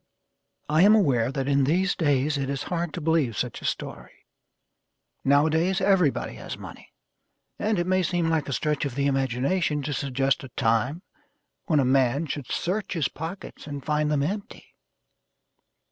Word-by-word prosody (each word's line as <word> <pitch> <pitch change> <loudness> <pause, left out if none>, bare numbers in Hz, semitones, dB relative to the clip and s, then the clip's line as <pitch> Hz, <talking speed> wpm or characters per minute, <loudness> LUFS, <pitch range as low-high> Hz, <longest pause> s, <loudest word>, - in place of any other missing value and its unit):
I 155 +2 +3
am 210 +3 +7
aware 130 - +2
that 135 0 -3
in 140 -1 +3
these 185 +7 +1
days 145 -2 +1
it 135 -1 -2
is 140 0 -2
hard 175 -2 -2
to 175 - -4
believe 150 - +1
such - - -3
a - - -8
story. - - -5 1.0
Nowadays, 160 +7 +3
everybody 190 -7 +2
has - - -7
money, - - -11 0.7
and 215 0 0
it 175 - 0
may 185 +1 +2
seem 175 -1 0
like 160 -3 0
a - - -1
stretch 150 +2 -1
of 140 -4 -3
the 140 0 0
imagination 140 +4 0
to 145 +2 -2
suggest 135 0 0
a 135 - -8
time 120 - +1 0.6
when 155 -6 +3
a 135 - +3
man 135 +3 +2
should 145 -4 -5
search 195 +4 -2
his 165 -6 0
pockets 165 +1 -8
and 145 -2 -6
find 150 0 +1
them 145 -2 +1
empty. 200 +6 -5
150 Hz, 165 wpm, -26 LUFS, 135-175 Hz, 1.0 s, am